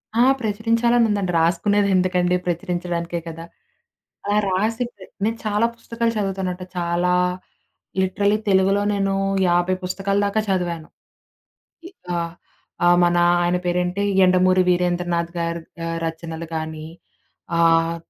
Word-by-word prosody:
ఆ! 235 - +4 0.2
ప్రచురించాలని 230 +2 +2
ఉందండి. 200 -3 0
రాసుకునేది 200 +5 +2
ఎందుకండి? 180 -1 +2
ప్రచురించడానికే 175 0 -2
కదా! 165 0 -7 0.8
అలా 205 +1 +1
రాసిందే 220 +1 -2 0.2
నేను 225 +2 0
చాలా 210 +1 +2
పుస్తకాలు 230 0 -2
చదువుతానంట. 190 -2 -2
చాలా 175 +1 +1 0.9
లిటరలీ 200 +2 +1
తెలుగులో 195 +1 +3
నేను 195 -1 0 0.4
50 175 +1 +2
పుస్తకాల 195 +2 -1
దాకా 205 +2 0
చదివాను. 175 -4 -1 1.0
ఇ - - -10 0.3
ఆ! - - 0 0.7
ఆహ్, 175 0 +6
మన 175 0 +3 0.3
ఆయన 175 +1 +1
పేరేంటి, 180 +2 0 0.2
'యండమూరి 185 0 +4
వీరేంద్రనాథ్‌గారి' 175 -1 -1 0.2
ఆహ్, 165 0 -3
రచనలు 165 0 -5
గాని, 160 -1 -5 0.7
ఆహ్, 165 0 +3
180 Hz, 110 wpm, -22 LUFS, 170-200 Hz, 1.0 s, ఆహ్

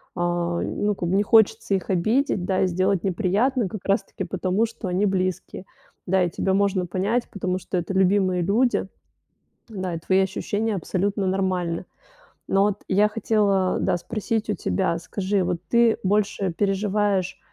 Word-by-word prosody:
а, 175 -1 -1
ну 205 -1 -1
как 175 -2 -3
бы 190 - +1
не 205 - +3
хочется 220 -1 +3
их 190 - -4
обидеть, 205 +2 +1
да, 190 -1 0
и 190 - +3
сделать 185 +1 0
неприятно 205 +6 +1
как 190 +1 -7
раз 195 0 +2
таки 195 - -7
потому, 185 +4 0
что 225 -3 -7
они 185 +3 +1
близкие. 185 -1 -2 0.4
Да, 185 0 +2
и 175 - 0
тебя 190 +3 -1
можно 195 -2 +1
понять, 200 +7 -1
потому 185 -2 -2
что 180 +1 -4
это 175 +3 -3
любимые 190 -1 +2
люди, 215 +4 +1 0.8
да, 185 -5 -4
и - - -3
твои 190 +3 +2
ощущения 205 +3 -1
абсолютно 195 +3 -1
нормальны. 185 -2 -1 0.6
Но 195 +1 +3
вот 205 -1 -1
я 205 +3 +4
хотела, 205 -3 +1
да, - - +1
спросить 220 +3 -3
у - - +1
тебя, 165 - -1
скажи, 190 +2 -1
вот 175 -1 -1
ты 235 -1 +4
больше 200 -2 0
переживаешь 195 -1 0
195 Hz, 165 wpm, -24 LUFS, 185-205 Hz, 0.8 s, я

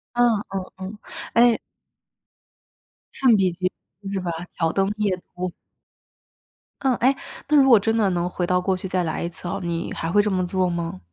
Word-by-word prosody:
嗯 245 0 +5 0.2
嗯 190 -1 -3
嗯， 190 +3 -7 0.4
诶 235 -1 +5 1.5
圣 250 -5 +4
彼 190 -3 +3
结 185 +1 -1 0.4
是 195 - -1
吧， 175 -2 -2 0.3
挑 165 -1 +1
灯 195 0 +1
夜 205 -3 +1 0.2
读。 180 0 -3 1.3
嗯， 260 -2 +3
诶， 260 +4 +3 0.3
那 300 - +3
如 270 - +4
果 230 -4 +8
真 225 +3 0
的 210 -4 +3
能 175 -1 0
回 180 0 -2
到 180 0 +3
过 185 +1 0
去 190 +1 -5
再 180 -1 0
来 160 - -2
一 170 - -2
次 175 0 -8
哦， 175 - -2
你 170 -1 -3
还 165 0 -3
会 205 - +4
这 210 -1 0
么 185 -1 +1
做 185 +1 +1
吗？ 170 - -3
185 Hz, 200 characters per minute, -23 LUFS, 175-210 Hz, 1.5 s, 果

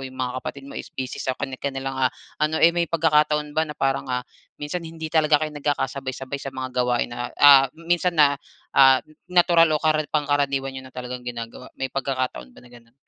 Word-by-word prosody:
yung 130 -1 -8
mga 130 0 -3
kapatid 140 +1 -7
mo 140 - -10
is - - -7
busy 130 -1 -6
sa 130 -1 -2
kani-kanilang 135 0 -4 0.2
ah, - - -18 0.3
ano 155 +1 +1
eh 170 +1 +5
may 170 -1 0
pagkakataon 150 -2 +2
ba 160 0 0
na 150 - -7
parang 135 -1 -1
ah, 125 0 -2 0.3
minsan 150 +4 -4
hindi 160 -1 -8
talaga 155 -2 +4
kayo 155 - -6
nagkakasabay-sabay 140 -2 -3
sa 135 - -6
mga 130 -1 -5
gawain 125 -1 +1
na, 120 0 -4
ah, 140 -2 +8
minsan 175 +1 0
na 145 -2 +4 0.3
ah, 135 -1 +7 0.3
natural 175 -2 +5
o - - -2
kara 155 -1 +3
pangkaraniwan 140 -2 0
niyo 130 0 -7
na - - -23
talagang 125 0 -6
ginagawa, 120 +1 -7
may 135 -1 -3
pagkakataon 130 - -3
ba - - -13
na 120 - -17
ganun? 115 0 -18
140 Hz, 195 wpm, -23 LUFS, 130-155 Hz, 0.3 s, ah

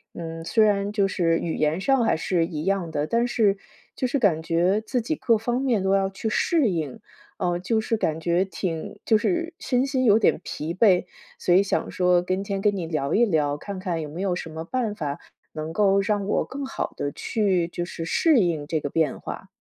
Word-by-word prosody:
嗯， 165 -1 -6
虽 215 +6 +3
然 205 -1 +1
就 200 -2 +2
是 165 -3 +1
语 165 - -3
言 155 +3 +1
上 265 +2 +3
还 - - +2
是 170 +1 +1
一 160 -2 -5
样 190 -4 0
的， 150 -1 -1
但 235 +6 +1
是 210 -5 +2 0.4
就 255 - -2
是 275 +2 0
感 170 -8 +2
觉 175 +5 +2
自 240 +3 -2
己 280 +8 -2
各 230 -6 +2
方 240 +2 -1
面 250 -6 +1
都 190 +1 +3
要 195 0 +2
去 195 +3 -4
适 295 - +2
应， 155 -7 -3 0.4
啊， 175 -1 0
就 220 +5 0
是 225 +1 -1
感 160 -5 -1
觉 175 +3 +2
挺， 175 -4 -5
就 220 - +4
是 340 - -1
身 250 0 0
心 260 -2 0
有 215 -1 +6
点 - - +3
疲 155 +2 -4
惫。 185 0 +4 0.3
所 175 - +2
以 190 - +6
想 200 - -1
说 180 -1 +3
今 185 +2 -2
天 195 -1 -3
跟 205 0 +2
你 175 - -3
聊 155 -3 -1
一 240 - +5
聊， 150 -7 +1
看 195 +4 -7
看 180 -3 -2
有 - - -5
没 160 +5 -6
有 190 -2 0
什 170 - -6
么 160 +1 -5
办 230 +3 -2
法 150 -7 -4 0.4
能 155 +1 -5
够 200 +1 +3
让 205 0 0
我 210 - +1
更 280 +1 -6
好 265 - -4
地 145 - -3
去， 190 -6 0
就 175 0 -4
是 170 -1 -6
适 305 - +3
应 165 -7 0
这 155 0 0
个 145 - -4
变 160 -3 0
化。 - - -7
190 Hz, 240 characters per minute, -24 LUFS, 165-220 Hz, 0.4 s, 有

